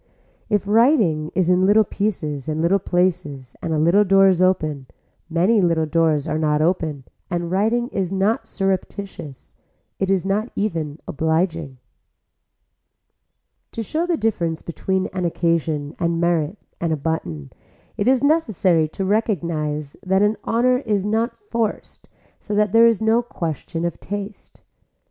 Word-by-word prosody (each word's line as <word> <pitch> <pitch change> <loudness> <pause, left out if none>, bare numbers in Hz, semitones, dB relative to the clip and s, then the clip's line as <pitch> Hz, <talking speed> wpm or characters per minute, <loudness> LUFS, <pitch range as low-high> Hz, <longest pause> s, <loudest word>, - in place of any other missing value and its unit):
If 205 -1 0
writing 210 - +3
is 180 -1 +2
in 180 +1 +3
little 215 +2 +5
pieces 160 -10 -3
and 155 0 -2
little 175 +5 +3
places 175 -8 -1
and 165 - -3
a 160 - +1
little 170 +7 +4
door 195 0 +5
is 185 -1 +2
open, 155 -7 +1 0.4
many 185 +7 +3
little 165 -3 +2
doors 155 -2 +1
are 155 - -1
not 150 -1 +1
open 155 -4 0 0.3
and 175 -2 -2
writing 225 +5 +1
is 190 -6 -2
not 205 +4 0
surreptitious, 195 -7 -4 0.5
it 195 - 0
is 195 -2 +1
not 210 +4 0
even 165 -8 -2
obliging. 160 -2 -1 2.0
To 230 - -3
show 320 - -2
the 345 -2 +1
difference 170 - -1
between 190 +3 -2
an 185 -1 -2
occasion 165 -3 -1
and 170 -1 0
merit 170 +1 0 0.2
and 170 -1 -1
a 155 - 0
button 90 - -4 0.4
it 205 - -1
is 260 +1 +3
necessary 210 - +2
to 190 +5 -4
recognise 165 -8 -1
that 190 +2 +2
an 210 +1 +2
honor 250 +2 +2
is 210 -6 -1
not 225 +3 0
forced 230 - -4 0.3
so 210 - -4
that 210 -1 +2
there 230 +2 +6
is 230 -2 +2
no 225 +2 +3
question 165 - -4
of 170 - -3
taste. 205 +1 -7
185 Hz, 150 wpm, -21 LUFS, 160-210 Hz, 2.0 s, there